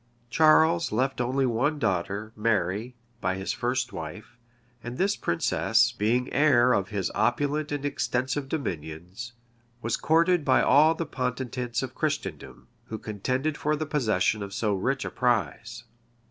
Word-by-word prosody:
Charles 160 +2 +4
left 130 +4 0
only 130 +2 +1
one 130 +6 0
daughter, 100 -1 -2
Mary, 105 +2 -1 0.2
by 95 -2 -1
his 95 0 -3
first 120 0 -2
wife; 85 +9 -8 0.5
and 120 +1 -6
this 200 +2 +1
princess, 110 +6 +2
being 120 +2 0
heir 125 -4 +4
of 95 -1 0
his 100 -4 -2
opulent 145 +6 0
and 145 -1 -3
extensive 135 0 -1
dominions, 90 - -5 0.5
was 115 - 0
courted 165 +2 +3
by 130 -2 +3
all 155 +3 +5
the 165 - -3
potentates 125 -3 -3
of 130 -1 -5
Christendom, 140 - -4 0.2
who 110 - -6
contended 130 +9 -2
for 150 +1 +1
the 155 +1 -3
possession 110 -8 +1
of 100 0 -6
so 105 -1 0
rich 130 +8 -1
a - - -4
prize. 115 -2 -1
125 Hz, 145 wpm, -27 LUFS, 105-145 Hz, 0.5 s, all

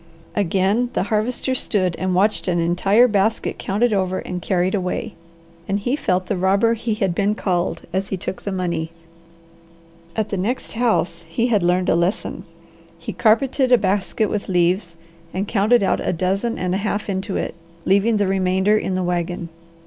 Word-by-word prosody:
Again 200 +5 +1
the - - +1
Harvester 240 +4 0
stood 185 -8 0
and 185 -1 0
watched 205 +3 +1
an 175 -1 +1
entire 195 +8 +4
basket 210 0 0
counted 220 +4 +1
over 185 -2 0
and 180 -1 -5
carried 180 0 0
away, 200 +3 -2 0.5
and 195 - 0
he 245 +6 -1
felt 185 -10 0
the 200 - -1
robber 195 +5 +3
he 225 -1 -2
had 195 -5 0
been 205 +3 +1
called 180 -4 -1
as 190 +1 -1
he 195 - -3
took 185 - -5
the 200 - -4
money. 170 -4 -2 1.3
At 215 -1 -1
the 200 - -2
next 220 +8 -2
house 200 -8 0
he 230 +9 0
had 210 -4 +3
learned 180 +1 +2
a - - +4
lesson. 175 +6 -1 0.5
He 165 - -6
carpeted 255 +4 +2
a 245 - +8
basket 205 +1 0
with 205 0 -3
leaves 175 0 +1 0.4
and 195 +2 -1
counted 220 +2 +3
out - - +1
a - - 0
dozen 195 +7 -1
and 180 0 -1
a 190 - 0
half 205 0 -2
into 195 0 -2
it, - - -3 0.3
leaving 200 +4 +3
the 205 - +2
remainder 190 +2 +2
in 190 -3 -1
the 185 - 0
wagon. 175 0 -2
195 Hz, 180 wpm, -21 LUFS, 180-215 Hz, 1.3 s, a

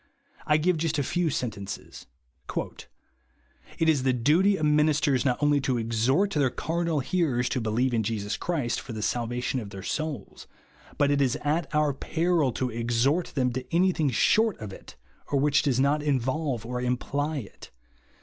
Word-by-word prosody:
I 150 - +4
give 170 +2 +1
just 160 0 -1
a 145 - +1
few 175 +4 0
sentences: 105 -7 -5 0.2
— 65 +1 -13
"It - - -5 1.0
is 155 -4 +3
the 130 0 +2
duty 165 - +3
of 155 - 0
ministers 150 -3 +3
not 125 -2 +2
only 145 -1 +3
to 130 -2 0
exhort 120 - +1
their 145 -6 +2
carnal 165 +1 -1
hearers 135 -5 0
to 130 - -1
believe 115 +4 0
in 115 - +2
Jesus 105 -1 -2
Christ 145 -9 -2
for 130 - -8
the 110 -1 -4
salvation 120 +2 -1
of 105 -4 -7
their 95 -1 -9
souls; 150 -4 -4 0.5
but 145 -1 +3
IT 140 0 +2
IS 135 +1 +2
AT 155 +3 0
OUR 150 -2 +2
PEEIL 160 0 0
TO 125 +2 -2
EXHORT 120 +8 0
THEM 125 -3 +1
TO 130 +1 -3
ANY 180 +3 +3
THING 155 -5 0
SHOET 220 - +3
OF 105 -3 -7
IT, - - -13 0.3
OR 140 - 0
WHICH 145 +1 +3
DOES 130 -3 +1
NOT 140 +3 +2
INVOLVE 135 -3 -1
OR 125 +1 -3
IMPLY 140 +4 -1
IT. - - -14
135 Hz, 180 wpm, -27 LUFS, 120-155 Hz, 1.0 s, I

